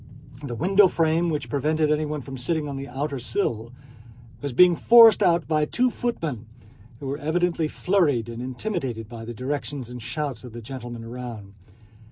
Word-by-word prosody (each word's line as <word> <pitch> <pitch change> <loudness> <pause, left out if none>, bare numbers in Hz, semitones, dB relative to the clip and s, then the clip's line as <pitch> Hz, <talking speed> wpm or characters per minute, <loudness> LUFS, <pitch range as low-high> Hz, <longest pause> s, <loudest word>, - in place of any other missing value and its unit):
The 135 -5 -5
window 190 - +5
frame 165 0 +1
which 150 -3 -2
prevented 150 +2 +1
anyone 150 -1 -1
from 135 +1 -8
sitting 150 +4 -1
on 140 - -5
the 135 0 -6
outer 140 +2 -3
sill 120 - -2 0.7
was 145 -1 -3
being 175 +7 +6
forced 230 +2 +7
out 170 -1 +3
by 155 -1 +2
two 250 +10 +1
footmen, 155 - -3 0.5
who - - -8
were 140 +2 -3
evidently 165 +1 0
flurried 150 - +1
and 115 0 -6
intimidated 130 - -4
by 115 0 -9
the 120 0 -7
directions 135 0 -4
and 125 0 -8
shouts 130 0 -4
of 125 -3 -10
the 120 - -7
gentlemen 120 -1 -7
around. 115 -4 -8
145 Hz, 170 wpm, -24 LUFS, 120-165 Hz, 0.7 s, forced